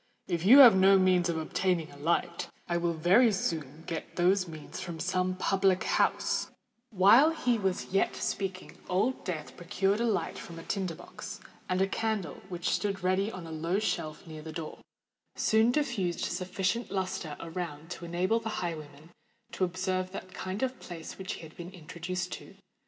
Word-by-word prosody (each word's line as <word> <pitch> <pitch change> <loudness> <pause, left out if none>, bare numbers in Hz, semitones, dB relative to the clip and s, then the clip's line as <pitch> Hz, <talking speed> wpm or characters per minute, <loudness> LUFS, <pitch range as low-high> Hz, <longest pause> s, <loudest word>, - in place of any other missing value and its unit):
If 170 -3 -1
you 245 +7 +9
have 240 -7 +10
no 195 +1 +6
means 185 -2 +3
of 165 - 0
obtaining 170 +1 0
a - - -13
light, 155 +4 -1 0.2
I 175 - -1
will 170 -1 0
very 190 +9 +5
soon 160 -6 -3
get 165 -2 -5
those 185 +2 +3
means 155 0 -8
from 175 -3 -6
some 185 0 0
public 190 0 +2
house——" - - +1 0.4
While 225 - +6
he 250 -8 0
was 190 -2 -1
yet 195 - +2
speaking 190 -2 -4
Old 210 +8 +1
Death 160 -4 -5
procured 195 +3 0
a - - +2
light 220 - -1
from 170 - -9
a 165 - -8
tinder 190 -4 -2
box; - - -9 0.3
and 185 +1 +2
a - - +1
candle, 205 -6 -2
which 175 -1 -2
stood 195 -2 -1
ready 190 +3 +1
on 185 -4 -8
a 165 - -8
low 165 +4 -1
shelf 155 -7 -2
near 155 -2 -8
the 160 +1 -7
door, 155 -1 -6 0.6
soon 220 +1 +3
diffused 240 - -1
sufficient 190 +5 -1
lustre 185 -5 -3
around 165 -1 -6
to 175 - -6
enable 180 +6 +1
the 225 -1 -4
highwayman 155 -2 -6 0.4
to - - -2
observe 185 +1 -1
what 185 -1 -7
kind 190 +5 -4
of 260 -1 -2
place 165 -3 -8
he 190 -1 -6
had 160 -1 -12
been 175 0 -8
introduced 180 +1 -5
into. - - -14
185 Hz, 175 wpm, -30 LUFS, 170-195 Hz, 0.6 s, have